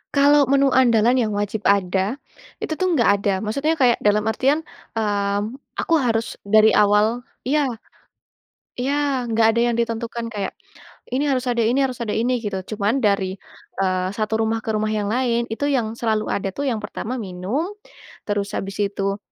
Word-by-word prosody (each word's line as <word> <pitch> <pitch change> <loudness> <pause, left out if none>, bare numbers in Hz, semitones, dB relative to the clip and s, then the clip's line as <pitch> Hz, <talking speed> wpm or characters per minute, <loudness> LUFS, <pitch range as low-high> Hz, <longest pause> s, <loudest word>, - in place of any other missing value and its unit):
Kalau 285 0 +5
menu 275 0 +3
andalan 245 -1 +4
yang 220 -3 0
wajib 205 +1 -2
ada, 195 +2 +2 0.5
itu - - -2
tuh 370 - +2
enggak 215 -6 +3
ada. 200 0 +1
Maksudnya 280 +9 0
kayak 250 -6 +3
dalam 210 0 +2
artian, 270 +8 +1 0.3
mmm, 205 -2 0 0.3
aku 335 - -1
harus 230 -4 -1
dari 215 +1 +6
awal 210 +4 +3 0.2
iya. 285 +2 +1 1.1
Iya, 270 -1 -1
nggak 225 0 +3
ada 235 - +2
yang 235 - -2
ditentukan 230 0 -2
kayak 200 -2 -2 0.6
ini 265 +4 0
harus 265 -3 +1
ada 240 - -2
ini 235 +4 +2
harus 255 -2 -1
ada 230 -3 -2
ini, 245 +2 +1
gitu. 205 -4 -4
Cuma 210 +1 0
dari, 200 -7 +1 0.5
eee, 185 -1 0
satu 215 +1 -1
rumah 225 0 0
ke 225 - -3
rumah 215 0 0
yang 210 -1 -1
lain, 235 0 +1
itu 230 +6 -2
yang 235 -5 -1
selalu 220 -2 0
ada 195 -1 -2
tuh, 280 -1 -1
yang 230 - -1
pertama 215 +4 -5
minum, 200 - -3 0.6
terus 205 0 -2
habis 195 -1 -4
itu, 200 -1 -1
225 Hz, 170 wpm, -22 LUFS, 205-255 Hz, 1.1 s, dari